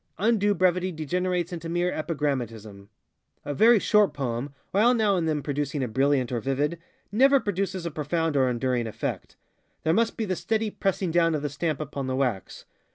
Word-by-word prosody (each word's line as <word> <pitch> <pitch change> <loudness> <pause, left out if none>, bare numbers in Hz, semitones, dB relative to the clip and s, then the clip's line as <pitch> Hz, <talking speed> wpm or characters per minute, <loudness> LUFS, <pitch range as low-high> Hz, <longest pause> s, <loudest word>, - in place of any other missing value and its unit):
Undue 205 -1 +2
brevity 185 +1 +2
degenerates 175 +2 -2
into 165 -1 -5
mere 175 +1 0
epigrammatism. 120 -10 -3 0.6
A 145 - -2
very 230 - +6
short 210 0 +3
poem, 130 0 -3 0.2
while 230 +6 +4
now 215 -4 +2
and 165 -3 0
then 150 -2 -1
producing 145 -1 -2
a - - -1
brilliant 130 +1 +1
or 120 - -1
vivid, 145 +7 -1 0.3
never 270 +6 +5
produces 195 -4 -2
a 170 - -3
profound 160 +1 -1
or 130 -2 +3
enduring 125 -1 -1
effect. 110 - -5 0.5
There 160 - +2
must 230 +4 +1
be 225 - -1
the 185 -2 -1
steady 220 +3 -1
pressing 195 -3 -1
down 165 -1 +3
of 150 - -3
the 145 - -1
stamp 145 +1 -2
upon 140 -3 -4
the 130 - -1
wax. 125 -8 -2
160 Hz, 180 wpm, -26 LUFS, 135-185 Hz, 0.6 s, very